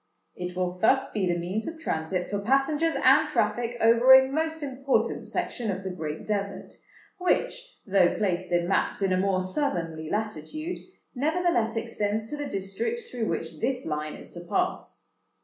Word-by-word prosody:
It 180 Hz, 0 st, -5 dB
will 180 Hz, 0 st, -2 dB
thus 265 Hz, +6 st, +3 dB
be 200 Hz, -4 st, 0 dB
the 175 Hz, -1 st, +1 dB
means 185 Hz, +6 st, -3 dB
of 325 Hz, 0 st, -6 dB
transit 180 Hz, -, -2 dB
for 205 Hz, -, 0 dB
passengers 275 Hz, +8 st, +2 dB
and -, -, +5 dB
traffic 240 Hz, 0 st, 0 dB
over 235 Hz, +3 st, +7 dB
a 265 Hz, 0 st, +5 dB
most 320 Hz, +1 st, -1 dB
important 270 Hz, 0 st, 0 dB
section 235 Hz, -3 st, -2 dB
of 195 Hz, 0 st, -3 dB
the 190 Hz, -, -3 dB
Great 155 Hz, -3 st, -5 dB
Desert, 200 Hz, -2 st, -3 dB, 0.5 s
which, -, -, -1 dB
though 190 Hz, -4 st, +3 dB
placed 185 Hz, -3 st, -1 dB
in 175 Hz, 0 st, +2 dB
maps 195 Hz, +1 st, +1 dB
in 190 Hz, -1 st, +2 dB
a -, -, +2 dB
more 190 Hz, 0 st, +1 dB
southernly 170 Hz, -, -2 dB
latitude, 220 Hz, -, -3 dB, 0.3 s
nevertheless 290 Hz, -5 st, +1 dB
extends 220 Hz, -1 st, -1 dB
to -, -, -2 dB
the 290 Hz, -1 st, -4 dB
District 195 Hz, -, -2 dB
through 235 Hz, -3 st, -2 dB
which 160 Hz, -1 st, -3 dB
this 255 Hz, -, -1 dB
Line 150 Hz, -1 st, -3 dB
is -, -, -11 dB
to 175 Hz, -, -9 dB
pass. 365 Hz, -, -3 dB
215 Hz, 165 wpm, -27 LUFS, 180-270 Hz, 0.5 s, over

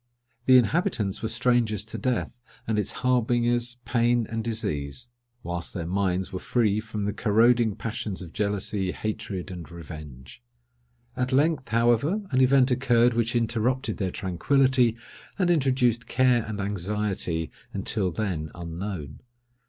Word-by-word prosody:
The 130 Hz, 0 st, +7 dB
inhabitants 125 Hz, -, +1 dB
were 110 Hz, -, -2 dB
strangers 120 Hz, -3 st, +1 dB
to 110 Hz, -, -6 dB
death, 125 Hz, -1 st, -2 dB, 0.3 s
and 110 Hz, -1 st, +1 dB
its 105 Hz, -, -2 dB
harbingers, 120 Hz, 0 st, +1 dB
pain 120 Hz, -1 st, +2 dB
and 115 Hz, 0 st, -2 dB
disease; 110 Hz, -, -3 dB, 0.3 s
whilst 85 Hz, +2 st, -4 dB
their 85 Hz, -3 st, -3 dB
minds 95 Hz, +1 st, -1 dB
were 95 Hz, -, -3 dB
free 110 Hz, -2 st, +1 dB
from 110 Hz, -2 st, -4 dB
the 105 Hz, -, -1 dB
corroding 115 Hz, 0 st, +3 dB
passions 110 Hz, -3 st, -4 dB
of 80 Hz, -, -11 dB
jealousy, 100 Hz, -2 st, -1 dB
hatred, 100 Hz, -3 st, -4 dB
and 85 Hz, -3 st, -8 dB
revenge. 75 Hz, -, -10 dB, 0.7 s
At 125 Hz, +1 st, -1 dB
length, 140 Hz, 0 st, +2 dB
however, 120 Hz, -, +2 dB
an 130 Hz, -1 st, +3 dB
event 130 Hz, 0 st, +4 dB
occurred 125 Hz, -1 st, +3 dB
which 115 Hz, +1 st, 0 dB
interrupted 120 Hz, +3 st, 0 dB
their 95 Hz, -3 st, -1 dB
tranquillity, 120 Hz, +7 st, +2 dB, 0.4 s
and 180 Hz, -3 st, +2 dB
introduced 130 Hz, -6 st, +2 dB
care 125 Hz, -3 st, +3 dB
and 110 Hz, -1 st, -5 dB
anxiety, 100 Hz, -4 st, -2 dB, 0.2 s
until 100 Hz, -5 st, +2 dB
then 85 Hz, -5 st, -3 dB
unknown. 85 Hz, -3 st, -6 dB
110 Hz, 135 wpm, -26 LUFS, 95-125 Hz, 0.7 s, The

